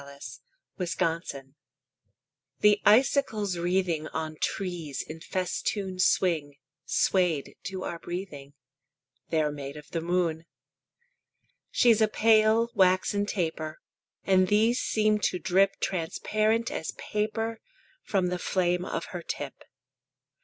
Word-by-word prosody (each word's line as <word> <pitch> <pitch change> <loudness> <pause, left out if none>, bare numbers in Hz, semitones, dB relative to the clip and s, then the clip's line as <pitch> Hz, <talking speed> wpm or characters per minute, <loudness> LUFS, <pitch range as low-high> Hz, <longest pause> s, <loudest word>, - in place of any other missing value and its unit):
SILVER 180 - -1
FILIGREE 160 -6 -2 1.1
The 210 0 +5
icicles 215 -5 +3
wreathing 175 -3 0
On 155 0 -4
trees 170 -8 -3
in 160 +1 -9
festoon 185 +2 -3
Swing, 160 -6 +2 0.3
swayed 175 -7 +1
to 185 0 -4
our 170 - -4
breathing: 165 -7 -7 0.8
They're 155 -2 +1
made 140 0 -7
of 150 - -12
the 165 - -2
moon. 170 -1 -1 1.2
She's 230 -3 +4
a 220 - +5
pale, 220 +1 +4
waxen 190 0 +2
taper; 160 -5 -3 0.4
And 185 -1 +4
these 220 +5 +3
seem 215 -1 +2
to 185 - 0
drip 190 +2 +2
Transparent 215 - 0
as - - -4
paper 220 +1 -2 0.4
From 190 -3 0
the 180 0 -2
flame 180 -2 0
of - - -3
her - - -4
tip. - - -5
185 Hz, 110 wpm, -28 LUFS, 165-210 Hz, 1.2 s, The